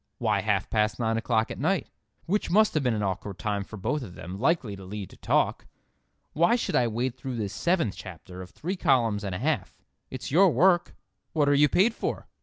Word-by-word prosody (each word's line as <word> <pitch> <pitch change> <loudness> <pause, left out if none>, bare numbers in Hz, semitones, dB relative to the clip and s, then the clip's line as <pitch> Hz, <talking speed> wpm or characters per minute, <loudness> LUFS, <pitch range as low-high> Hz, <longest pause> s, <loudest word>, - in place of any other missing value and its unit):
Why 105 -5 +1
half 105 -2 0
past 105 -1 +1
nine 115 -1 0
o'clock 115 -1 0
at - - -6
night, - - 0 0.4
which 205 +4 0
must 215 +4 +4
have 155 - +1
been 125 -4 +1
an 105 - -2
awkward 95 0 -3
time 105 -2 -2
for 110 - -10
both 150 +10 -1
of 95 -8 -9
them—likely 105 - -1
to 95 - -10
lead 100 0 -7
to - - -15
talk? - - 0 0.7
Why 170 +8 +4
should 245 - -2
I 120 - +3
wade 120 +3 -1
though 130 -2 -4
this 105 -3 -3
seventh 170 - +1
chapter 90 0 -9
of 90 - -9
three 180 - -4
columns 115 - +2
and 95 -3 -3
a - - -2
half? - - -2 0.3
It's - - -6
your 185 +6 +6
work. 175 +5 +3 0.4
What 150 -3 +2
are 145 - +4
you 145 +1 +5
paid 205 - +3
for?" - - -4
115 Hz, 215 wpm, -27 LUFS, 100-155 Hz, 0.7 s, your